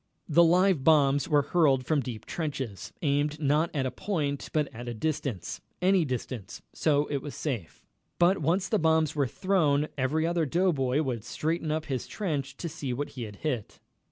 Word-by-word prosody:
The 170 +2 +5
live 180 -2 +4
bombs 145 -2 +4
were 145 -2 +4
hurled 140 -6 +3
from 155 -3 +2
deep 120 -4 -6
trenches, 135 - -4
aimed 145 +1 +1
not 150 +2 +2
at 135 -2 0
a 130 - -1
point, 150 -8 -2
but 150 -2 +1
at 120 +2 -8
a 120 - -4
distance 135 - -3 0.2
any 185 -2 +3
distance, 125 -4 -5
so 145 -2 +2
it 145 - +1
was 145 - -7
safe. 120 - -5 0.3
But 175 +3 +4
once 180 +6 +1
the 215 0 +1
bombs 160 -1 +2
were 140 -3 +2
thrown, 155 -3 +1
every 150 +5 +1
other 170 -2 +1
doughboy 150 -4 +1
would 120 -6 -3
straighten 160 +6 -2
up 155 0 -1
in - - -16
his 130 -3 -2
trench 145 -9 -3
to 170 - -4
see 150 -5 -4
what 145 +4 -3
he 125 -3 -6
had 105 -1 -9
hit. 125 -9 -3
150 Hz, 185 wpm, -28 LUFS, 135-165 Hz, 0.3 s, The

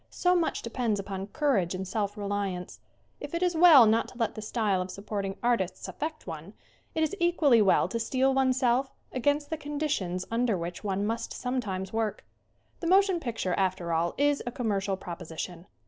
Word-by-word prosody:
So 360 0 +2
much 340 -2 0
depends 230 -3 -1
upon 195 0 -5
courage 205 - +1
and 190 0 -4
self 205 +1 -2
reliance. 200 -3 -3 0.4
If - - -6
it 340 - 0
is 360 -1 +2
well 320 -7 +9
not 225 +1 +3
to - - -13
let 230 -3 0
the 215 - -7
style 210 -3 0
of 185 - -4
supporting 200 0 -4
artists 190 -7 0
affect 310 +1 -5
one, 160 +5 -7 0.4
it 320 - +2
is 315 +6 -1
equally 320 -9 +4
well 195 -3 +4
to 230 - -2
steel 260 +3 +1
one's 265 -1 +2
self 260 +1 +2 0.2
against 285 +4 0
the 320 - -1
conditions 285 - -2
under 230 -3 +1
which 170 +3 -5
one 200 0 -1
must 225 +2 -3
sometimes 210 -7 -3
work. 220 -2 -2 0.5
The 340 - -3
motion 380 0 +4
picture, 225 - -2
after 185 -3 0
all, 165 +1 0
is 290 0 +2
a - - -1
commercial 200 -5 -1
proposition. 170 0 -7
225 Hz, 180 wpm, -28 LUFS, 190-275 Hz, 0.5 s, well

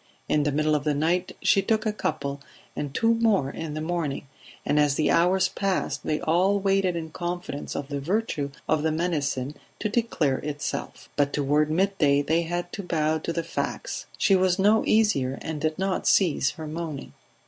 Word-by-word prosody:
In 150 - +2
the 145 0 +1
middle 155 +2 +1
of 150 -2 +1
the 150 -1 +1
night 170 +5 0
she 195 - +4
took 215 +3 0
a 215 - +1
couple, 140 -7 -3 0.3
and 145 -2 -3
two 225 +10 +2
more 215 -12 +2
in 155 -1 -5
the 155 - -3
morning, 160 -4 -2 0.4
and 150 - +2
as 145 -2 +3
the 155 - +2
hours 185 +2 +4
passed 195 -1 -2
they 155 - +1
all 185 +5 +2
waited 195 -2 +2
in 160 -1 -5
confidence 175 -3 -4
for - - -3
the 140 0 -4
virtue 160 -3 -1 0.2
of 155 -1 +2
the 160 +1 +1
medicine 150 -5 -1 0.2
to 215 - -2
declare 205 - +1
itself. 145 0 -5
But 145 -1 +1
toward 150 +1 +2
midday 155 -5 +2
they 160 +3 +2
had 175 +1 -3
to 200 - -4
bow 160 -3 0
to 160 - -3
the 165 0 -2
facts: - - -4
she 205 -5 +4
was 185 -1 +3
no 210 +3 +4
easier 140 -13 +2
and 155 -2 -4
did 155 0 0
not 190 -1 -1
cease 160 -8 +3
her 160 - -7
moaning. 155 -2 -5
160 Hz, 190 wpm, -26 LUFS, 150-190 Hz, 0.4 s, she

